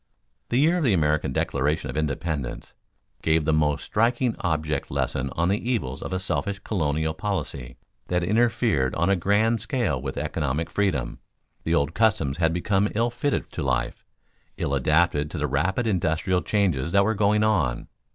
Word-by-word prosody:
The 120 - +1
year 165 +6 +3
of - - -1
the 115 -8 +3
American 75 -4 +1
Declaration 70 +4 -1
of - - -9
Independence 75 -3 -3 0.5
gave 80 -1 +2
the 80 - +2
most 75 -2 +1
striking 120 +2 +1
object 80 -3 -1
lesson 65 -1 -1
on 85 +1 +1
the 105 +4 -1
evils 70 - -2
of - - -5
a 95 - 0
selfish 100 +2 -2
colonial 80 -6 -1
policy 80 -10 -4 0.3
that 90 0 0
interfered 105 - +1
on 85 +4 +2
a - - +4
grand 105 +5 +2
scale 120 - -1
with 65 0 -5
economic 75 +1 -2
freedom. 75 -13 -1 0.5
The 80 - +2
old 75 0 +1
customs 110 -11 +1
had 80 -2 +3
become 95 +4 +1
ill 115 +2 +1
fitted 140 +4 -2
to - - -5
life, 65 -2 -1 0.5
ill 70 - -2
adapted 75 +2 +2
to 85 - -6
the 75 - 0
rapid 85 - 0
industrial 90 -2 +1
changes 85 -9 0
that 100 0 +5
were 110 - +2
going 105 0 +2
on. 80 - +1
85 Hz, 170 wpm, -25 LUFS, 75-105 Hz, 0.5 s, that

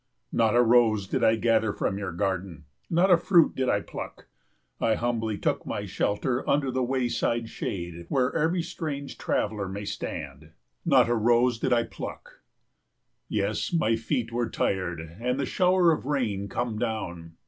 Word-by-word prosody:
Not 115 -1 +2
a 120 - +6
rose 115 -4 +4
did - - -1
I 110 - +5
gather 110 -1 +2
from 100 0 -2
your 100 -3 -3
garden, 90 -3 -3 0.2
not 180 +3 +3
a 175 - +8
fruit 170 -1 +4
did 130 -1 0
I - - +2
pluck. - - -8 0.5
I 110 - +2
humbly 115 -3 -1
took - - -1
my - - -4
shelter 120 +5 -1
under 140 -2 +2
the 130 +1 -1
wayside 120 -2 0
shade 85 -4 -5
where 130 -1 +1
every 165 +2 +1
strange 140 -4 -5
traveller 105 -2 -1
may 100 +2 -5
stand. 80 -7 -6 0.3
Not 135 -8 +5
a 120 - +2
rose 120 +1 +3
did 130 - -1
I 120 -1 +4
pluck. - - -9 0.9
Yes, - - -1
my 115 -10 +2
feet 115 +1 -2
were 120 0 -1
tired, 90 -3 -1 0.2
and 125 +3 -1
the 140 - 0
shower 180 +2 +3
of 150 -4 -2
rain 110 -9 -1
come 115 -1 -2
down. 90 -8 -4
115 Hz, 165 wpm, -27 LUFS, 100-130 Hz, 0.9 s, a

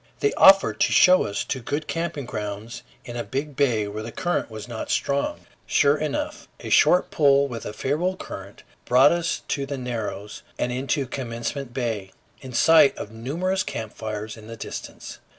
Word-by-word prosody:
They 425 - +1
offered 195 0 +6
to - - +3
show 185 0 +6
us 100 - -2
to 130 - -3
good 145 +6 -3
camping 165 -5 -3
grounds 105 0 -5 0.2
in 120 - -7
a 120 - -2
big 140 +2 -4
bay 120 -7 +1
where 105 +1 -5
the 115 +2 -7
current 175 0 -1
was 110 0 -8
not 120 -2 -6
strong. 140 0 -1 0.3
Sure 140 +1 +4
enough, 155 -1 -3
a - - -7
short 180 - +5
pull 140 -2 +4
with 120 -4 -6
a - - -4
favorable 155 - -1
current 100 - -9 0.2
brought 130 +3 +6
us 170 -1 -1
to 140 -1 -1
the 140 0 -4
Narrows 110 -5 -5 0.2
and 125 - -1
into 135 +2 -1
Commencement 125 +1 -5
Bay, 115 -7 -3 0.3
in 130 - -9
sight 155 +2 +5
of 105 - -7
numerous 165 +12 -2
camp 110 - -5
fires 110 0 -5
in 110 -1 -12
the 115 0 -8
distance. - - -8
130 Hz, 180 wpm, -24 LUFS, 110-145 Hz, 0.3 s, offered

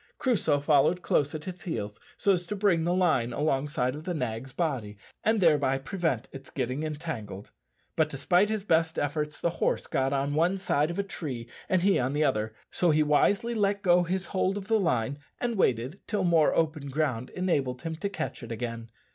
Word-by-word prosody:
Crusoe 185 - +2
followed 150 +5 +3
close 145 +1 +1
at 155 - -5
his 180 0 -7
heels, 105 - -4 0.2
so 200 - +3
as 175 -1 -2
to 210 - -3
bring 190 -5 +2
the 175 - +2
line 155 -10 +2
alongside 135 -3 0
of 150 +2 -7
the 180 +1 -3
nag's 125 -1 -3
body, 125 - -2 0.3
and 220 0 +3
thereby 145 -6 +3
prevent 145 - -2
its 135 -1 -10
getting 130 +2 -2
entangled; 150 - -5 0.4
but 155 -1 +2
despite 180 +8 +2
his 215 -2 -1
best 165 -3 +2
efforts 150 +1 -2
the 170 - 0
horse - - +1
got 135 0 0
on 140 +1 0
one 170 +5 +2
side 155 -5 +1
of 170 - -4
a 200 - +1
tree 135 -11 -6 0.2
and 185 -2 +2
he 195 0 +4
on 130 +2 0
the 150 +1 +2
other, 110 -5 0 0.2
so 175 - +2
he 155 0 +4
wisely 195 +10 +2
let 200 -2 0
go 180 -1 +5
his 180 +2 -1
hold 190 0 0
of 195 -1 -6
the 225 0 +3
line, 130 - 0 0.2
and 240 -1 -1
waited 130 - +1
till 205 -3 0
more 165 -4 +4
open 155 -3 0
ground 130 -4 -1
enabled 140 -9 -1
him 165 -1 -3
to 200 +5 -3
catch 160 -5 -5
it 115 -1 -8
again. 115 0 -5
155 Hz, 200 wpm, -28 LUFS, 135-180 Hz, 0.4 s, go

